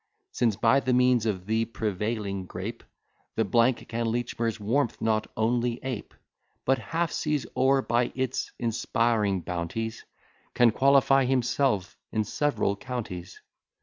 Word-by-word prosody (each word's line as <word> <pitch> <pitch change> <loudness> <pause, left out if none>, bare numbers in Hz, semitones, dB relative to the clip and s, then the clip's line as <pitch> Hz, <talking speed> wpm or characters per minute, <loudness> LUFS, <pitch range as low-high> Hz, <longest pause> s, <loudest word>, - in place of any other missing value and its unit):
Since, 115 -4 +1
by 115 +7 +4
the 130 -2 0
means 125 -2 +3
of 95 -4 -2
the 110 +2 +1
prevailing 105 -3 -3
grape, 100 +7 -6 0.5
Thn 115 +3 +2
can 115 0 -2
Lechmere's 115 -1 -1
warmth 120 +5 0
not 110 -1 +1
only 120 +2 +1
ape, 130 -5 -5 0.5
But, 135 +1 +3
half 165 0 -1
seas 150 -5 -1
o'er, 135 0 +3
by 120 +1 +1
its 130 0 -2
inspiring 115 -4 +1
bounties, 90 +7 -4 0.5
Can 120 -2 +5
qualify 135 +1 +4
himself 125 -5 0
in 110 - +1
several 140 -5 0
counties. 100 -6 -6
115 Hz, 125 wpm, -27 LUFS, 105-125 Hz, 0.5 s, Can